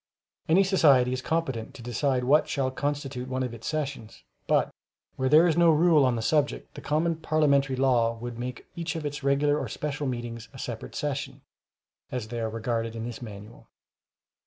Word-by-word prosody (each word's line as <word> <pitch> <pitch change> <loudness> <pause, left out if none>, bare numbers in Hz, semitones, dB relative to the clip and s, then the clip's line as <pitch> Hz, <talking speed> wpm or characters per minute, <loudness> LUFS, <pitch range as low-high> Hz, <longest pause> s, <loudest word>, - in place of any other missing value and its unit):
Any 185 +5 +6
society 140 -10 +4
is 130 - -2
competent 135 -8 -2
to 120 - -10
decide 125 +2 0
what 145 +5 +4
shall 135 -2 0
constitute 135 -2 -3
one 130 0 -2
of 125 -2 -4
its 115 -1 -8
sessions, 140 - -4 0.2
but, - - +2 0.4
where 130 0 0
there 155 +4 +7
is 165 - +3
no 170 -1 +5
rule 160 -2 +5
on 125 -2 +2
the 115 - -3
subject, 145 +4 0
the - - -9
common 160 +2 0
parliamentary 140 -4 +2
law 120 -3 +2
would 120 0 -7
make 125 0 -5
each 170 -1 -3
of 160 -2 -4
its 145 0 -4
regular 145 +2 +2
or - - -3
special 145 -1 -3
meetings 120 -2 -5
a - - -11
separate 120 -3 -6
session, 145 -2 -3 0.7
as 120 -4 -4
they 120 0 -4
are 110 -1 -1
regarded 115 0 -2
in 115 0 -4
this 120 0 -7
Manual. 105 -1 -10
130 Hz, 185 wpm, -27 LUFS, 120-150 Hz, 0.7 s, there